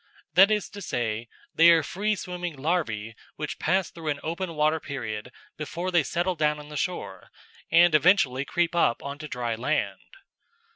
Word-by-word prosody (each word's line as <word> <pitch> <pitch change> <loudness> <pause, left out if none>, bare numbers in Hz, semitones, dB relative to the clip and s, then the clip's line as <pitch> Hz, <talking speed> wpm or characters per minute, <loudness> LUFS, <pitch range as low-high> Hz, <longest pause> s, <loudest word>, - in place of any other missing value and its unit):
That 195 +3 +7
is 210 -1 0
to 205 - -9
say, 115 - -2 0.3
they 165 +1 +7
are 165 -2 +5
free 210 +7 -1
swimming 180 -4 -5
larvæ 135 -8 -1 0.2
which 150 - -5
pass 185 +3 +1
through 165 -2 -9
an 145 -1 -1
open 170 +1 -3
water 155 +1 +2
period 125 -6 -5 0.3
before 170 +4 -4
they 175 -2 +4
settle 175 +5 -1
down 150 -2 +1
on 150 0 -11
the 150 - -8
shore, 100 - -4 0.4
and 170 0 +6
eventually 155 -5 +4
creep 175 +4 0
up 145 -8 +2
on 140 +1 -6
to 155 - -6
dry 120 -4 -3
land. 110 -5 -1
155 Hz, 175 wpm, -26 LUFS, 130-175 Hz, 0.4 s, That